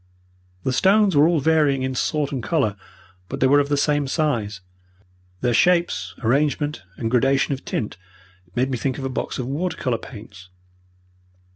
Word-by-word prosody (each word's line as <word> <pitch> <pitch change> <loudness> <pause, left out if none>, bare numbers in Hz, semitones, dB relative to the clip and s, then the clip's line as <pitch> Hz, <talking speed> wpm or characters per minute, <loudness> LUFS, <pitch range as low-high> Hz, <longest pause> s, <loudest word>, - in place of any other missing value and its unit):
The 130 - 0
stones 195 +4 +4
were 145 +2 +6
all 170 -2 +2
varying 145 -3 +2
in 130 0 -2
sort 145 +3 -1
and 135 -3 -3
colour, 120 -5 0 0.5
but - - -5
they - - +3
were 140 +2 +5
of 140 0 0
the 145 - +1
same 145 0 +1
size. 115 - -1 0.8
Their 120 - +1
shapes, 175 +6 +2
arrangement, 145 +3 +1 0.2
and 115 -1 -2
gradation 135 +3 +2
of 135 - -6
tint 105 - -3 0.6
made 130 +2 +1
me 125 - -2
think 130 +2 -2
of 135 - -5
a - - -1
box 130 - -3
of 125 - -3
water 160 +7 -2
colour 120 -3 -1
paints. 105 -6 -12
135 Hz, 170 wpm, -22 LUFS, 125-150 Hz, 0.8 s, were